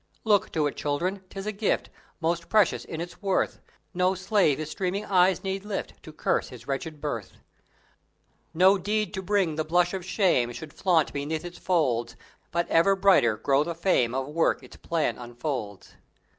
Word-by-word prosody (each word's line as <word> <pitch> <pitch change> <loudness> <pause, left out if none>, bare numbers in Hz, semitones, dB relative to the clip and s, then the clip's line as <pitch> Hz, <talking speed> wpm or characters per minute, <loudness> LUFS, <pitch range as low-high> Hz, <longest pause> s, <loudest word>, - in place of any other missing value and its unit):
Look 205 -3 +2
to 155 -2 +1
it, 145 - -2
Children! 180 +7 -2
'Tis 195 0 -7
a 215 - -1
gift 210 0 -1 0.3
Most 170 0 -1
precious 210 -4 +3
in 160 - -6
its 175 +4 -7
worth; 195 -2 0 0.3
No 185 +1 +2
slave 185 -6 +2
his 155 0 -5
streaming 195 +1 -2
eyes 185 -1 +3
need 195 0 -3
lift 210 -1 -5
To - - -11
curse - - -1
his - - -11
wretched 145 +3 -4
birth! 115 -9 -4 1.2
No 185 +4 +5
deed 210 +2 -1
to 190 - -3
bring 190 -5 +1
the 155 - +1
blush 175 +3 +2
of 190 -2 -3
shame 175 - +2
Should 150 +4 -9
flaunt 170 -5 +2
beneath 155 +4 -3
its 175 0 -8
folds; 135 -10 0 0.3
But 170 +1 -1
ever 195 +4 +4
brighter 185 - +4
grow 135 +5 +2
the 170 +1 -4
fame 145 -9 +1
Of 135 0 -1
work 160 +3 +1
its - - -13
plan 165 -6 -1
unfolds. 120 -4 -5
170 Hz, 175 wpm, -27 LUFS, 150-190 Hz, 1.2 s, No